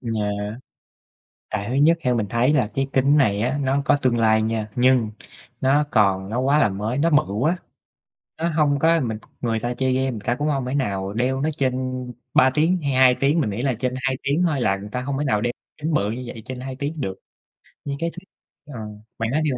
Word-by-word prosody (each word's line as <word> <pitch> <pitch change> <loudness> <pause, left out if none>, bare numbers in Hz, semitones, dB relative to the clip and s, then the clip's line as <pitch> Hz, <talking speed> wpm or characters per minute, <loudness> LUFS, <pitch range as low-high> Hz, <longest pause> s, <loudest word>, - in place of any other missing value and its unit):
yeah. 105 -2 -3 0.9
Tại 105 -2 -2
thứ - - -2
nhất 160 +5 +4
theo 125 -5 +1
mình 110 -3 0
thấy 120 +4 +2
là 130 - +3
cái 135 0 0
kính 135 +2 +4
này 105 -8 +3
á, 130 +5 0
nó 135 +1 +1
có 145 - +4
tương 125 -2 +2
lai 110 -1 +4
nha, 110 -1 -2
nhưng 125 -3 +3 0.5
nó 140 +3 +3
còn 95 -3 +2
nó 115 - -2
quá 140 +3 +3
là 110 - +4
mới, 105 +7 -3
nó 165 +3 +2
bự 150 -8 +2
quá, 155 - +1 0.8
nó 165 - -1
hông 150 -3 +2
có 165 +2 +4
mình 115 -6 -2 0.2
người 115 -2 0
ta 120 +2 -2
chơi 130 +1 0
game, 130 0 +1
người 115 - -5
ta 120 - 0
cũng 145 +4 -2
hông 135 -4 0
thể 130 - -3
nào 100 -7 -1
đeo 130 +4 0
nó 155 - +1
trên 130 -2 +1 0.6
3 130 - +6
tiếng 165 +5 +2
hay 140 - -1
2 130 -1 +6
tiếng. 145 +4 +2
Mình 120 - 0
nghĩ 105 +3 -3
là 130 -1 +1
trên 125 -1 -1
2 135 -1 0
tiếng 145 +6 +1
thôi 145 -5 -1
là 95 - +2
người 100 +2 -8
ta 125 - -2
hông 135 +1 -3
thể 150 - -1
nào 105 -6 +1
đeo 120 +1 0 0.3
kính 155 +1 -2
bự 100 -6 +1
như 125 +3 -5
vậy 115 -1 -8
trên 130 -1 -6
2 130 0 -6
tiếng 145 +2 -4
được. 95 -5 -3 0.7
Nhưng 140 -1 -3
cái 170 0 0
thứ - - -20 0.6
ờ, 115 - -6 0.4
bạn 115 0 -1
nói 150 +5 +1
đi 150 - +1
130 Hz, 240 wpm, -22 LUFS, 110-145 Hz, 0.9 s, 3